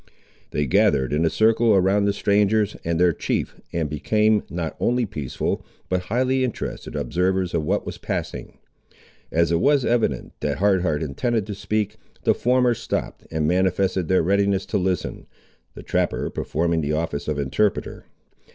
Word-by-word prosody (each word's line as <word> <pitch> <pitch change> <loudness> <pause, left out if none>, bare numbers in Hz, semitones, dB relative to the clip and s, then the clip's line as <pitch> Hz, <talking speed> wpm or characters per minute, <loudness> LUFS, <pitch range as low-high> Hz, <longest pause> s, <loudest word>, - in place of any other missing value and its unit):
They 75 - -1
gathered 65 +1 +2
in 80 +3 +2
a - - +3
circle 110 +1 +3
around 95 +2 +3
the 100 - +3
strangers 105 +1 +2
and 85 0 -1
their 90 -1 +4
chief, - - -3
and 80 -2 -1
became 105 +8 +2
not 85 -2 -4
only 125 0 +1
peaceful, 75 - -3 0.3
but 90 -1 -1
highly 130 +3 +1
interested 125 -4 -4
observers 90 +1 0
of 80 - 0
what - - 0
was - - -6
passing. - - -5 0.7
As 85 0 +2
it 85 - +2
was 140 +4 +3
evident 115 - 0
that - - -1
Hard 100 -2 +3
Heart 80 -3 0
intended 110 - -1
to 105 - -5
speak, 105 +1 -2 0.3
the - - +4
former 125 0 +2
stopped, - - -4
and 80 -1 -1
manifested 95 0 +1
their 95 -2 +3
readiness 100 +1 +2
to - - -1
listen, 90 0 -2 0.5
the - - -9
trapper - - -1
performing 85 +1 -1
the 75 0 -1
office 80 -2 -2
of 75 -1 -1
interpreter. 75 +9 -1
95 Hz, 160 wpm, -23 LUFS, 80-105 Hz, 0.7 s, their